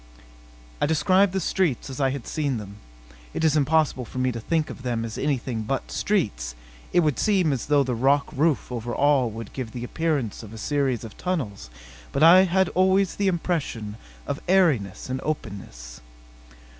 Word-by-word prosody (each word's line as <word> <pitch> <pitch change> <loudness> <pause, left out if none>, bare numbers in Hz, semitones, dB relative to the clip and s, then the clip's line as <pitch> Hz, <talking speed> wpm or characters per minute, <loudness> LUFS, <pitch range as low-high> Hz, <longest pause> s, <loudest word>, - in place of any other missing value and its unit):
I - - +3
described 185 +5 +3
the 190 - -1
streets 175 -7 0
as 135 0 -5
I 135 - +3
had 135 -2 -5
seen 145 -5 -1
them. 100 -1 -8 0.6
(It - - -1
is 155 -2 +3
impossible 150 -2 +2
for 125 - -10
me 130 0 +1
to 115 - -5
think 160 +6 -1
of - - -10
them 120 -2 -2
as 110 - -6
anything 130 -5 -1
but 130 +5 -3
streets; 100 - -1 0.4
it 175 - +4
would 150 -5 +1
seem 185 -8 +2
as 130 - -4
though 145 -1 +4
the 130 -1 -2
rock 140 +5 +2
roof 150 -2 +1
over 120 0 -4
all 140 -4 +3
would 110 -1 -8
give 125 -4 -5
the 120 - -5
appearance 145 -5 -1
of 110 -1 -11
a - - -8
series 135 -1 0
of 110 - -9
tunnels; 135 - -3 0.4
but 140 - +1
I 180 +3 +8
had 190 +1 +2
always 190 0 +2
the 200 - +1
impression 160 - -2 0.3
of - - -4
airiness 160 - +2
and 130 0 -3
openness.) - - -6
140 Hz, 180 wpm, -25 LUFS, 115-165 Hz, 0.6 s, I